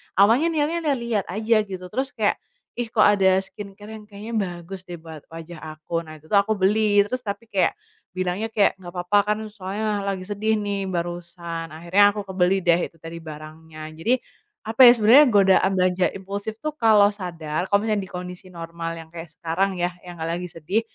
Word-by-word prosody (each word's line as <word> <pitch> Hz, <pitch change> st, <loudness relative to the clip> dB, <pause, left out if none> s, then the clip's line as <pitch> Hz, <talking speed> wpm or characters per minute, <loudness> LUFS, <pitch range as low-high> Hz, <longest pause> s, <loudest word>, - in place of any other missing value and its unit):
Awalnya 225 Hz, -, +5 dB
niatnya 310 Hz, +2 st, 0 dB
liat-liat 235 Hz, -5 st, -1 dB
aja 220 Hz, +5 st, +1 dB
gitu, 185 Hz, -1 st, -7 dB
terus 270 Hz, +2 st, -2 dB
kayak, 215 Hz, -3 st, +1 dB, 0.4 s
"Ih, 240 Hz, -, -1 dB
kok 215 Hz, -1 st, +3 dB
ada 190 Hz, -2 st, +4 dB
skincare 205 Hz, +1 st, -11 dB
yang 220 Hz, -1 st, -9 dB
kayaknya 210 Hz, +2 st, -9 dB, 0.3 s
bagus 185 Hz, +2 st, -9 dB
deh 175 Hz, -, -6 dB
buat 160 Hz, -2 st, -11 dB
wajah 165 Hz, 0 st, -10 dB
aku." 160 Hz, +2 st, -3 dB
Nah, 155 Hz, -, -9 dB
itu 155 Hz, +1 st, -18 dB
tuh 200 Hz, -, +6 dB
aku 215 Hz, +2 st, +1 dB
beli, 205 Hz, +1 st, +3 dB
terus 255 Hz, +5 st, -3 dB
tapi 205 Hz, +1 st, -4 dB
kayak 195 Hz, -, +2 dB, 0.4 s
bilangnya 185 Hz, +4 st, -1 dB
kayak, 210 Hz, -3 st, +1 dB
"Nggak 175 Hz, -1 st, -10 dB
papa 205 Hz, +3 st, +3 dB, 0.2 s
kan, 220 Hz, -, -6 dB
soalnya 205 Hz, +1 st, -3 dB
lagi 190 Hz, -2 st, -2 dB
sedih 210 Hz, +3 st, -1 dB
nih 200 Hz, -2 st, -2 dB
barusan," 170 Hz, -1 st, -5 dB
akhirnya 200 Hz, +5 st, +3 dB
aku 205 Hz, -, -3 dB
kebeli 190 Hz, 0 st, +1 dB
deh 175 Hz, 0 st, +3 dB
itu -, -, -29 dB
tadi 165 Hz, +1 st, -9 dB
barangnya. 155 Hz, 0 st, -10 dB
Jadi, 185 Hz, +11 st, +1 dB, 0.5 s
apa 225 Hz, +4 st, +1 dB
ya, -, -, +11 dB
sebenarnya 235 Hz, +7 st, +7 dB
godaan 195 Hz, -2 st, +4 dB
belanja 180 Hz, 0 st, +2 dB
impulsif 200 Hz, +3 st, -6 dB
tuh 305 Hz, +5 st, -4 dB
kalau 215 Hz, -6 st, +5 dB
sadar 170 Hz, -3 st, -4 dB
kalau 205 Hz, +1 st, +2 dB
misalnya 215 Hz, -2 st, 0 dB
di 190 Hz, -, -9 dB
kondisi 180 Hz, +1 st, -8 dB
normal 165 Hz, -1 st, -6 dB
yang 160 Hz, 0 st, -11 dB
kayak 165 Hz, -1 st, -8 dB
sekarang 175 Hz, +5 st, -2 dB
ya, 175 Hz, 0 st, -1 dB
yang 175 Hz, -1 st, -10 dB
nggak 160 Hz, -, -4 dB
lagi 180 Hz, -, -5 dB
sedih, 175 Hz, +7 st, -1 dB
190 Hz, 190 wpm, -23 LUFS, 170-210 Hz, 0.5 s, ya